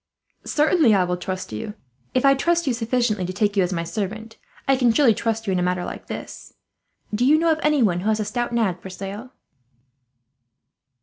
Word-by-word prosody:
"Certainly, 300 - +3
I 190 - +3
will 180 0 -1
trust 185 -2 -5
you. 205 - -5 0.4
If 255 - +2
I 275 - +7
trust 340 +5 +1
you 260 - +1
sufficiently 230 -3 0
to 180 - -3
take 205 +2 0
you 195 - +3
as 180 0 0
my 170 -2 -1
servant, 215 +6 -5 0.3
I 270 - +5
can 250 -2 +3
surely 240 -1 +4
trust 225 +1 -2
you 195 - 0
in 180 - +1
a - - 0
matter 180 0 0
like - - -8
this. - - -8 0.6
Do 215 +4 +1
you 290 +5 +5
know 330 +1 +2
of 315 - 0
anyone 245 - +2
who 205 +4 -1
has 220 0 +1
a 215 - -1
stout 240 +2 -2
nag 215 -7 0
for 190 - -8
sale?" 200 +6 -7
220 Hz, 205 wpm, -23 LUFS, 185-255 Hz, 0.6 s, I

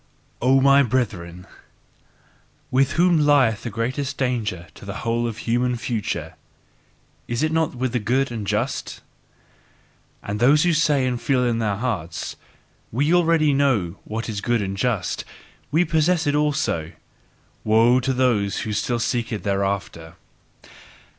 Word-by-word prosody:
O 130 +2 +4
my 140 +1 +6
brethren! 95 -9 -2 1.3
With 135 +2 +2
whom 175 -1 +3
lieth 130 -7 +3
the 120 - -5
greatest 130 +6 -3
danger 110 -9 -2
to - - -15
the 100 -1 -6
whole 115 +1 0
human 120 +2 -1
future? 105 -9 -3 0.9
Is 120 +4 -1
it 155 - +1
not 160 -4 0
with 130 0 -2
the 120 - +1
good 125 +5 0
and 110 -4 -5
just? 110 +6 -2 1.2
As 100 +1 -3
those 140 +6 +5
who 175 -1 +3
say 150 -4 +2
and 125 -2 -2
feel 125 +1 +1
in 115 -1 0
their 105 -3 0
hearts: 100 -8 -4 0.6
"We 145 +8 +1
already 165 -4 +3
know 120 -11 +1
what 110 +2 -5
is 105 -3 -4
good 120 -2 0
and 95 0 -3
just, 110 -2 -1 0.5
we 165 +5 +2
possess 160 +1 +1
it 145 - +1
also; 140 - 0 0.7
woe 115 +3 +4
to 130 +1 -1
those 120 -6 +1
who 110 - -3
still 120 +3 -1
seek 115 0 -1
thereafter!" 100 -6 -3
120 Hz, 140 wpm, -22 LUFS, 105-140 Hz, 1.3 s, my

